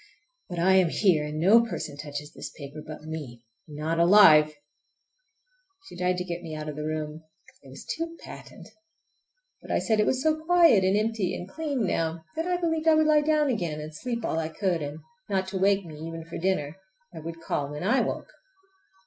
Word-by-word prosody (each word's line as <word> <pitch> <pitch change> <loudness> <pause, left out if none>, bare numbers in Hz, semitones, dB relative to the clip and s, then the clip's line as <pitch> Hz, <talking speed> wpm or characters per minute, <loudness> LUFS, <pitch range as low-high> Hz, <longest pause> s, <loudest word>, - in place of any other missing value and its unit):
But 175 - -6
I 180 +3 +4
am 185 -3 +4
here, 165 -5 +2
and 150 +1 -5
no 200 +9 +6
person 155 -10 -5
touches 145 0 -7
this - - -7
paper 145 +1 -8
but 155 0 -10
me—not 150 +2 -6
alive! 160 -5 +7 1.3
She - - -12
tried 180 0 0
to 180 - -2
get 175 -1 -5
me 160 -3 -7
out 155 0 -6
of 150 - -5
the 150 0 -4
room—it 155 +9 -8
was - - -11
too 330 0 -4
patent! - - -11 0.9
But - - -14
I - - +1
said 220 -3 +1
it 210 - +3
was 260 0 0
so 315 0 +1
quiet 335 - +5
and 190 +2 +3
empty 215 -3 -1
and 180 - -7
clean 280 -1 -2
now 165 -2 -1
that 325 +2 -2
I 360 0 +1
believed 325 -2 -1
I 320 - +7
would 310 0 +4
lie 305 -1 +5
down 305 0 +2
again 170 -9 -2
and 155 +1 -7
sleep 235 +3 -4
all 160 - -1
I 160 -1 -2
could; 175 -1 -1
and 145 +2 -6 0.3
not 190 -1 0
to 190 -1 -3
wake 195 0 +2
me 155 -2 -10
even 165 +1 -7
for 165 - -7
dinner—I 190 +1 -4
would 165 +1 -7
call 145 -3 -2
when 150 +3 -6
I 225 +8 +3
woke. - - -4
175 Hz, 200 wpm, -27 LUFS, 155-220 Hz, 1.3 s, alive